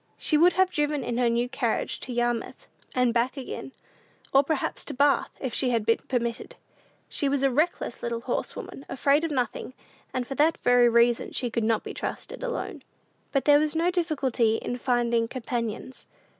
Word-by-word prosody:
She 310 - 0
would 345 +4 +6
have 375 0 +3
driven 295 -2 0
in 240 0 -2
her 245 -1 +3
new 235 +1 +1
carriage 240 -2 -1
to 255 - -6
Yarmouth 240 -1 -2 0.3
and 250 -2 +3
back 245 +4 +1
again, 270 0 -6 0.6
or 270 - +7
perhaps 300 0 -2
to - - -6
Bath, 285 +1 +3
if 260 -3 -4
she 260 - +1
had 230 -3 0
been 230 - +3
permitted. 240 - -2 0.5
She 285 - -1
was 275 -1 0
a 270 - +4
reckless 300 -2 0
little 235 -1 -3
horsewoman, 270 - -4
afraid 280 +3 +2
of 330 - 0
nothing, 255 -1 -2 0.4
and 255 -2 -2
for 270 - -5
that 305 +3 +3
very 245 -1 +5
reason 235 0 +3 0.2
could 230 - 0
not 220 0 +1
be - - -6
trusted - - -5
alone. - - -4 0.5
But 275 - 0
there 290 -1 +7
was 305 +1 0
no 335 +2 +2
difficulty 275 -10 +1
in 245 +2 -3
finding 235 -2 +1
companions. 235 0 -4
255 Hz, 180 wpm, -26 LUFS, 235-290 Hz, 0.6 s, or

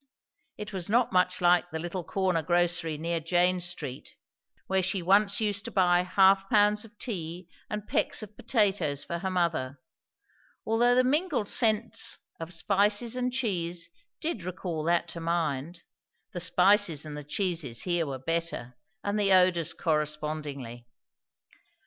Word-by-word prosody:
It 210 0 -7
was 185 -2 -4
not 235 +2 +2
much 180 0 +2
like 175 0 +3
the 160 - -4
little 175 +2 -5
corner 185 -1 0
grocery 175 -1 0
near 165 +2 -2
Jane 180 +3 +2
Street, 160 -7 -5 0.5
where 190 0 +1
she 185 0 0
once 200 +3 +3
used 205 -2 0
to - - -4
buy 180 -2 +3
half 195 +1 +3
pounds 210 0 +3
of 225 -1 -16
tea 175 -6 -5 0.2
and 210 0 -5
pecks - - 0
of 210 0 -11
potatoes 195 - +1
for 170 - -4
her 190 - -3
mother; 165 -7 -1 0.9
although 240 +2 +3
the 255 - +4
mingled 285 - 0
scents 225 0 +1 0.2
of 165 +1 -6
spices 205 +6 +1
and 250 0 -1
cheese 175 -9 -2 0.3
did 310 - -3
recall 175 -3 -4
that 170 0 +1
to 170 - -7
mind; 165 -1 -2 0.5
the 175 - -5
spices 180 -3 +3
and 150 -1 -7
the 150 - -7
cheese 155 - -1
here 175 -3 0
were 135 -1 -4
better, 165 -4 -3 0.3
and 205 +1 -1
the 200 -1 +2
odours 180 -3 +4
correspondingly. 150 -6 -3
180 Hz, 150 wpm, -28 LUFS, 165-205 Hz, 0.9 s, the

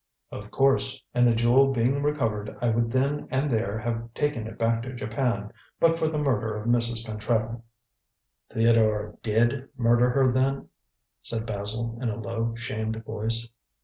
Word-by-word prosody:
"Of 105 0 -8
course, 135 +1 +2
and 125 0 +4
the 115 - +3
jewel 125 +4 +4
being 130 +3 +1
recovered, 115 -8 -1
I 120 - +1
would 115 0 +1
then 140 +3 0
and 135 +2 0
there 110 -2 0
have 115 +1 -4
taken 145 -7 -1
it 115 - -9
back 115 0 +1
to 130 +2 -7
Japan, 115 -2 -2 0.3
but 165 0 +3
for 160 - +1
the 155 -1 -2
murder 115 -7 0
of 105 - -6
Mrs. 120 -1 +4
Pentreddle." 110 +1 -2 0.9
"Theodore 110 -2 +2
did 120 +5 +1
murder 120 +1 +3
her, 130 0 +3
then?" 135 +2 0 0.5
said 115 -1 -3
Basil 110 +2 -2
in 120 - -1
a 115 +1 -4
low, 115 +1 -3
shamed 110 -1 -4
voice. 115 +2 -2
115 Hz, 160 wpm, -26 LUFS, 110-130 Hz, 0.9 s, and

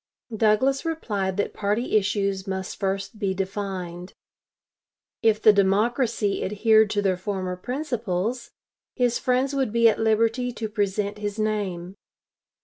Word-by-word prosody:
Douglas 225 +6 +2
replied 205 - -2
that 205 - -1
party 215 +4 -1
issues 200 -1 0
must 190 -1 -4
first 195 +3 -3
be 195 -3 -1
defined. 190 -2 -5 1.1
If 220 -1 +3
the 215 -1 +6
Democracy 210 +2 +1
adhered 220 +2 +3
to 205 -1 0
their 190 -2 +1
former 185 -1 -3
principles, 235 - -3 0.5
his 245 -2 +1
friends 255 +2 +1
would 270 -5 0
be 230 +1 +5
at 220 - +2
liberty 225 +3 +1
to 225 -1 -4
present 205 -1 -2
his 205 0 -4
name. 200 -5 -2
210 Hz, 130 wpm, -24 LUFS, 195-230 Hz, 1.1 s, the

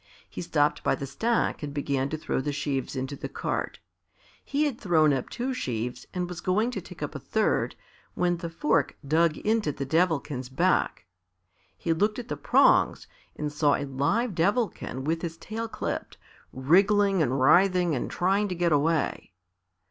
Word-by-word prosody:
He - - -7
stopped 150 -4 +1
by - - +2
the 140 - -5
stack 225 - 0
and 145 -1 -6
began 140 -1 -1
to 155 - -3
throw 155 - -2
the 145 - -2
sheaves 140 -2 -2
into 130 +2 -3
the - - -6
cart. - - -3 0.7
He 285 +2 0
had 275 -6 -3
thrown 160 -6 +4
up 130 -2 -2
two 260 +2 -3
sheaves 125 - -4
and 180 -1 -2
was 175 -1 -7
going 215 +6 +1
to - - -4
take - - -9
up - - -4
a - - -5
third, - - 0 0.4
when 175 -1 +1
the 170 0 -5
fork 150 -3 0
dug 160 +1 +3
into 215 -6 0
the 140 0 -5
Devilkin's 150 -4 0
back. 170 - +1 0.7
He 165 - 0
looked 210 +6 +1
at 245 -1 -7
the - - -2
prongs - - +3 0.3
and 150 -1 -4
saw 145 -1 +3
a 145 - -3
live 145 - 0
Devilkin 185 - -1
with 165 +3 -1
his 165 -2 -5
tail 225 +5 -5
clipped, - - -4 0.3
wriggling 195 +7 +3
and 135 -2 +1
writhing 180 +4 +4
and 125 - -2
trying 195 +3 +1
to 185 - -3
get 175 -1 +1
away. 150 -7 0
165 Hz, 175 wpm, -27 LUFS, 140-195 Hz, 0.7 s, thrown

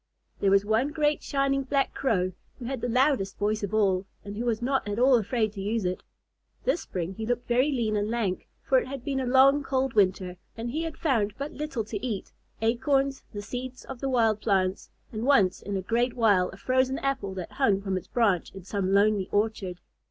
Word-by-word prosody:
There 200 - +3
was 195 +1 +4
one 220 +5 +2
great 295 0 +1
shining 275 -1 0
black 275 +1 0
Crow 185 -9 0 0.3
who 245 - -8
had 260 -1 -3
the 245 - -1
loudest 250 -6 +2
voice 210 +1 0
of 200 -2 -3
all, 195 -3 +2 0.2
and 205 0 -6
who 235 +3 -3
was 230 -2 0
not 265 -1 0
at 205 0 -2
all 260 +2 +5
afraid 220 -1 0
to 200 - -6
use 210 +1 -1
it. 180 0 -2 0.6
This - - +1
spring 180 0 -4
he 220 +3 -5
looked 245 0 -1
very 255 +5 +3
lean 230 -5 0
and 205 0 0
lank, 220 -6 -2 0.2
for 265 -1 +4
it - - -5
had 270 -2 -6
been 275 -2 -1
a 260 - -2
long, 270 +3 +6
cold 265 -2 -1
winter, 185 -3 +1 0.2
and 235 +1 -4
he 310 +5 -2
had 325 -1 -4
found 225 - +1
but 280 +2 -4
little 295 -6 -3
to 210 -1 -6
eat, 220 -6 -3 0.3
acorns, 270 +4 +1
the 205 -2 -6
seeds 250 +4 -6
of 265 -2 -8
the 270 - -2
wild 225 -4 +2
plants, 190 -3 0 0.2
and 220 -1 -4
once 245 -9 +3
in 200 0 -3
a 190 - -4
great 235 +4 0
while 205 -6 +3
a 190 - -11
frozen 260 +4 +1
apple 265 -9 -2
that 185 -2 -6
hung 215 -8 +2
from 195 -1 -2
its 185 - -4
branch 205 -8 +1
in 195 - -9
some 195 0 -1
lonely 200 -1 +3
orchard. 205 -4 -1
225 Hz, 220 wpm, -27 LUFS, 200-265 Hz, 0.6 s, long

